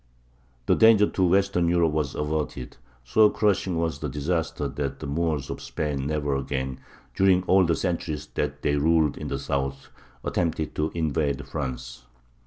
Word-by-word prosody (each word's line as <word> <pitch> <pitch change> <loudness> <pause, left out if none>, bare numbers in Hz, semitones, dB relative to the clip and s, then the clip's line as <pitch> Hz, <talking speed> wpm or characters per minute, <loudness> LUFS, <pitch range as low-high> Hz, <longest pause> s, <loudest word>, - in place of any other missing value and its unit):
The - - +4
danger 110 -2 +6
to 95 - -1
Western 95 -1 +2
Europe 85 -2 +3
was 75 -2 -1
averted. 75 -4 -3 0.3
So 105 +12 +5
crushing 95 -5 +1
was 80 -3 -1
the 75 -1 -3
disaster 80 +4 -2
that 70 -1 -4
the - - -6
Moors 75 -1 -1
of - - -6
Spain 70 -3 -3
never 75 -2 -1
again, 65 -1 -3 0.3
during 95 -1 +3
all 95 0 +4
the 85 0 +2
centuries 80 -5 -2
that - - -3
they 75 -1 +2
ruled 80 0 +3
in - - -6
the - - -2
south, 70 0 -3 0.3
attempted 80 -2 -1
to 75 +1 -1
invade 70 -3 -1
France. 65 -4 -5
75 Hz, 160 wpm, -25 LUFS, 70-85 Hz, 0.3 s, danger